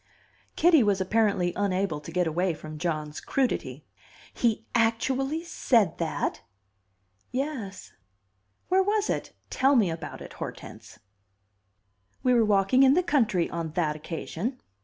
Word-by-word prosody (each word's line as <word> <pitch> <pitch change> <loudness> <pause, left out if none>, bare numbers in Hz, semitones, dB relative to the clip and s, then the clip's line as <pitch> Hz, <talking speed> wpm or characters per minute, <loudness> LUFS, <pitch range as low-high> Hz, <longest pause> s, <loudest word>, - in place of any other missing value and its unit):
Kitty 330 -3 +5
was 205 -3 +2
apparently 190 -3 +1
unable 190 -5 0
to 150 - -10
get 180 +1 +1
away 170 +2 0
from 155 0 -9
John's 155 -3 -3
crudity. 265 -2 -2 0.5
"He 225 -2 0
actually 260 +7 +1
said 225 - +1
that?" 165 -2 -2 0.9
"Yes." 250 -8 -4 0.7
"Where 375 +1 +4
was 415 +2 +1
it? - - -4 0.2
Tell 275 +2 +3
me 205 -9 +3
about 165 0 -6
it, - - -10
Hortense." - - -9 1.3
"We 255 - +4
were 235 -2 +5
walking 205 +4 +3
in 270 +1 +6
the 365 - +3
country 220 - +2
on 165 -2 -4
that 160 -4 0
occasion." 170 - -5
205 Hz, 130 wpm, -27 LUFS, 170-260 Hz, 1.3 s, in